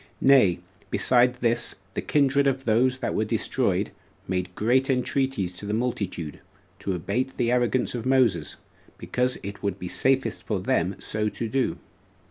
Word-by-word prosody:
Nay, 125 -11 +5 0.3
besides 125 0 +3
this, 120 0 +1 0.2
the - - -2
kindred 140 -1 +2
of 135 0 -1
those 125 +3 +3
that 130 - -2
were 110 - +1
destroyed 105 - 0 0.4
made 90 0 -2
great 130 +5 +2
entreaties 130 -7 0
to 100 - -7
the 105 - 0
multitude 100 -10 -3 0.4
to 95 - -2
abate 105 +10 -2
the 120 -1 +1
arrogance 125 0 +1
of 120 -2 -4
Moses, 120 - +2 0.4
because 125 0 -1
it 100 +1 -7
would 100 -2 -2
be 90 - -6
safest 135 +7 +1
for 105 -4 0
them 90 0 0
so 105 0 -2
to 115 - -4
do. 130 +3 0
120 Hz, 155 wpm, -25 LUFS, 100-130 Hz, 0.4 s, Nay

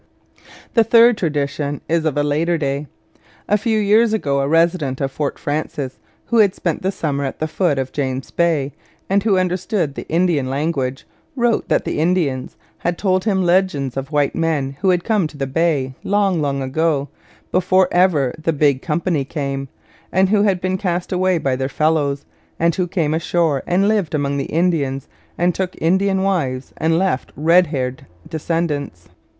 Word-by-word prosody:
The 230 - +5
third 230 +1 +6
tradition 145 -4 -2
is 165 0 +1
of 150 -2 0
a 145 - +2
later 160 +4 +1
day. 140 -1 -2 0.6
A 210 - +3
few 220 +1 0
years 215 +2 +4
ago 140 -10 0
a 135 - 0
resident 165 -4 +1
of 135 -1 -1
Fort 145 +1 -3
Frances, 145 -3 -3 0.3
who 235 - +1
had 200 -3 +4
spent 170 -3 -2
the 190 - 0
summer 145 -6 -2
at 135 - -4
the 155 - -2
foot 160 -2 0
of 130 -1 -2
James 130 -2 -3
Bay, 160 -5 +1 0.4
and 200 +1 +4
who 200 -2 +2
understood 185 -3 -1
the - - -8
Indian 165 -5 +1
language, 135 -2 -2 0.3
wrote 240 -3 +1
that - - +1
the - - -2
Indians 155 -6 0 0.2
had 175 0 -1
told 185 -1 +1
him 195 -4 +1
legends 175 -7 +1
of 135 +2 -4
white 145 -2 +1
men 150 -5 -1
who 190 - +3
had 180 -1 +2
come 210 -6 +1
to 155 - -14
the 135 - -1
Bay 140 -2 0
long 195 -4 +1
long 140 -2 -1
ago, 145 +1 0 0.4
before 185 0 +3
ever 165 -8 +3
'the 165 +1 0
Big 140 -3 +2
Company 165 -2 -1
came,' 140 -1 -4 0.4
and 190 +1 +3
who 205 0 +3
had 195 -3 +2
been 185 +1 -1
cast 175 -2 -2
away 185 -1 +2
by 135 -5 0
their 130 +1 -2
fellows, 145 -1 0 0.3
and 170 +1 +3
who 180 +1 -1
came 165 -4 0
ashore 160 -3 +1
and 185 +3 +2
lived 205 -7 +1
among 140 -1 -1
the 140 - -2
Indians 150 -6 0 0.3
and 175 +1 +2
took 185 +1 -4
Indian 190 +3 +2
wives 135 -10 -1
and 160 +1 +1
left 180 -7 0
red 170 +4 +4
haired 130 -4 -4 0.2
descendants. 155 - -3
160 Hz, 180 wpm, -19 LUFS, 140-185 Hz, 0.6 s, third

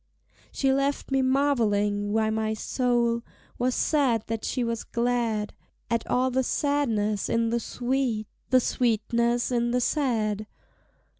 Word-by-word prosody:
She 270 -1 +1
left 275 +1 -1
me 270 0 +3
marvelling 215 -7 +1
why 220 0 +1
my 220 0 -1
soul 235 0 0 0.4
Was 250 +1 +1
sad 260 -8 +2
that 225 -1 -4
she 250 - -1
was 230 -1 -2
glad; 235 -3 -1 0.4
At 230 - 0
all 255 +1 +1
the 260 +1 +2
sadness 235 -8 0
in 230 0 +1
the 235 - +1
sweet, 245 -2 -1 0.2
The 255 0 +5
sweetness 235 +1 +1
in 240 -1 +1
the 250 +1 +1
sad. 220 -7 0
235 Hz, 135 wpm, -26 LUFS, 220-260 Hz, 0.4 s, The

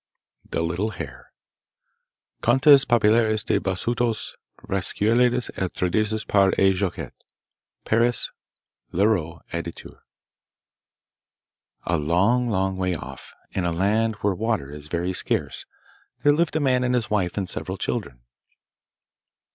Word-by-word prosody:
The - - -1
Little 85 +6 -1
Hare 65 -7 -8 1.1
Contes 135 +3 +6
populaires 110 -2 +3
des - - +2
Bassoutos. 115 +4 -1 0.3
Recueillis 115 +6 +1
et 95 -2 -2
traduits 110 +4 0
par 100 -2 +4
E. 95 0 +4
Jacottet. 95 -1 -3 0.7
Paris: 115 +2 +1 0.6
Leroux, 85 -4 +1
Editeur. 85 0 -6 1.9
A 85 - +1
long, 100 +11 +2
long 95 -2 0
way 90 -1 0
off, 65 -4 -9 0.2
in 95 - -2
a 85 - 0
land 105 +6 +1
where 100 -1 +2
water 105 -8 -2
is 75 0 -8
very 85 +3 -2
scarce, - - -1 0.6
there 145 - +6
lived 165 +1 0
a - - +2
man 130 -3 +2
and 125 0 +1
his 120 -2 -1
wife 95 -4 0
and 95 -2 -1
several - - -4
children. - - -4
100 Hz, 120 wpm, -24 LUFS, 90-115 Hz, 1.9 s, Contes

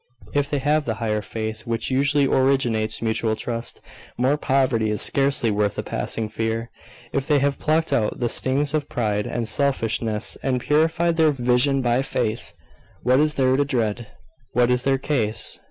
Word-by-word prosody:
If 145 -1 +1
they 145 - 0
have 145 +2 +1
the 115 - -2
higher 110 -1 -1
faith 110 +1 -6
which 115 +2 -2
usually 140 +2 +2
originates 125 -6 +1
mutual 110 0 0
trust, 115 +1 -4 0.4
mere 130 +4 +2
poverty 130 -6 +1
is 105 - 0
scarcely 135 -4 +2
worth 105 -1 0
a - - -2
passing 110 -1 -3
fear. 115 +2 -3 0.4
If 135 -1 -1
they 150 - +4
have 140 0 0
plucked 160 +1 +1
out 105 -2 0
the 120 - +1
stings 140 +5 +1
of 150 -2 -1
pride 105 -3 -1
and 115 -2 -3
selfishness, 115 -3 0
and 130 -2 0
purified 165 +5 +1
their 160 -1 +5
vision 130 0 +2
by 120 +1 +2
faith, 110 -9 -3 0.5
what 130 +2 +4
is 150 0 +2
there 130 -1 +3
to 145 - +3
dread? 120 -5 -2 0.5
What 125 +1 +3
is 125 0 +2
their 135 +1 +1
case? 120 -6 -1
125 Hz, 170 wpm, -23 LUFS, 110-140 Hz, 0.5 s, their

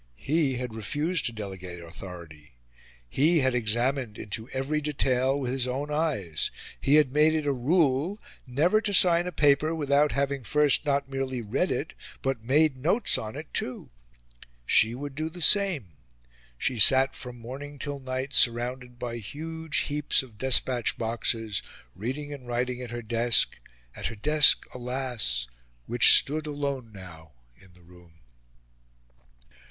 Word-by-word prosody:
He 145 - 0
had 125 -2 -5
refused 145 - -1
to - - -3
delegate 95 -5 -7
authority; 85 -4 -11 0.5
he 155 - +2
had 130 -1 +1
examined 120 0 -1
into 110 +3 -5
every 135 +3 -2
detail 135 -2 0
with 125 -3 -3
his 130 -1 0
own 140 +4 -4
eyes; 140 - -1 0.3
he 140 - +3
had 150 -4 +3
made 155 +2 +4
it 155 -2 -1
a 145 - +1
rule 150 - +1 0.3
never 165 +12 +2
to 205 -2 0
sign 175 -1 +5
a - - -3
paper 150 +1 +2
without 145 -1 +2
having 140 -1 -1
first, 150 +3 +2
not 140 -1 0
merely 135 -1 -3
read 105 -3 -1
it, - - -3 0.3
but 135 -4 -2
made 145 +3 +2
notes 175 - +2
on 110 +1 -7
it 150 +2 -9
too. 125 - -4 0.7
She 110 - +3
would 145 +2 -7
do 155 +3 -3
the 175 +2 -11
same. 180 - +4 0.7
She 125 - -2
sat 135 +5 +6
from 125 -1 -9
morning 135 +5 -9
till 145 +1 -5
night 130 +1 -5
surrounded 125 +1 +1
by 120 -1 -5
huge 160 +7 -4
heaps 145 -2 0
of 115 -5 -16
despatch 130 -2 +2
boxes, 115 -3 -1 0.3
reading 140 +8 -5
and 130 -4 -11
writing 125 +1 -2
at 125 - -7
her 120 0 -6
desk 115 +1 +1 0.4
at - - -3
her 115 - -6
desk, 150 +6 +4
alas! 125 - -1 0.4
which 120 0 +8
stood 155 +2 -1
alone 140 -5 -4
now 85 -6 -13 0.2
in 95 +7 -21
the 90 -1 -21
room. 85 -2 -19
130 Hz, 150 wpm, -27 LUFS, 115-145 Hz, 0.7 s, which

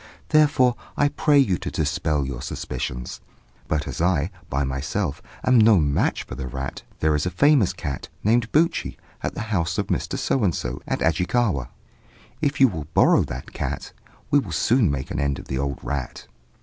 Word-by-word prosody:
Therefore 145 -5 +4 0.2
I 145 - +3
pray 145 0 +2
you 115 -11 +3
to - - -4
dispel 75 -1 0
your 65 -3 -5
suspicions. 60 0 -5 0.5
But 75 -1 -1
as - - -4
I, 85 -1 +1 0.2
by 70 +1 0
myself, 70 +5 -2 0.2
am 130 -2 +5
no 110 -1 +6
match 70 -4 +1
for - - -10
the 65 0 -5
rat, 65 +1 -5 0.2
there 80 0 +3
is 75 +3 0
a - - +1
famous 130 - +4
cat, 70 -4 -5
named 115 +2 +2
Buchi, 165 +3 +1 0.2
at - - -3
the - - -3
house 85 -2 0
of - - -1
Mr. - - -1
So 130 - 0
and 90 -5 +2
so, - - -4
at - - -2
Ajikawa: 85 - +1 0.7
if 145 -2 0
you 135 - +8
will 80 - -5
borrow - - +5
that 65 +2 -7
cat, - - -4 0.4
we 145 - +6
will 100 -11 -5
soon 115 +6 +3
make 70 -2 -3
an 75 - -2
end 70 -1 0
of - - -11
the 65 - -1
old 70 0 -2
rat.' 70 -4 -4
85 Hz, 190 wpm, -23 LUFS, -, 0.7 s, you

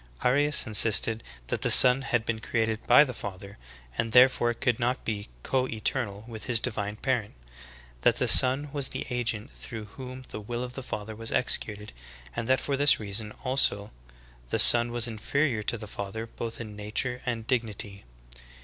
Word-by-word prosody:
Arius 145 +4 +2
insisted 110 +1 +4 0.2
that - - -4
the - - 0
Son 125 +1 +8
had 120 -4 -2
been 115 -1 -3
created 110 -1 -2
by 125 +4 +7
the 130 -4 -6
Father, 100 - -10 0.4
and 115 -1 -2
therefore 125 -1 +4
could 120 -1 -1
not 125 +2 -2
be 105 -2 -5
co 130 -1 -1
eternal 110 -2 -4
with 110 -2 -9
His 120 -2 +2
divine 105 -1 -4
Parent; 115 -2 -3 0.7
that - - +3
the - - -1
Son 135 +3 +5
was 140 -2 -1
the - - -1
agent 120 -1 -3
through 110 -3 -9
whom 130 +4 -11
the 105 - -8
will 120 +3 -5
of 125 0 -8
the 135 - -7
Father 110 -3 -7
was 115 +1 -7
executed, 105 - -2 0.4
and 115 - -4
that 130 0 +2
for 140 - -3
this 145 0 +3
reason 105 0 -3
also 125 -6 0 0.6
the - - -1
Son 120 0 +9
was 120 0 -2
inferior 120 +2 -2
to 115 - -3
the 105 - -9
Father 100 +2 -7
both 115 0 -8
in 110 -3 -9
nature 115 +4 -4
and 115 -3 -4
dig 125 0 +1
nity. 100 -3 -7
115 Hz, 180 wpm, -26 LUFS, 105-125 Hz, 0.7 s, Son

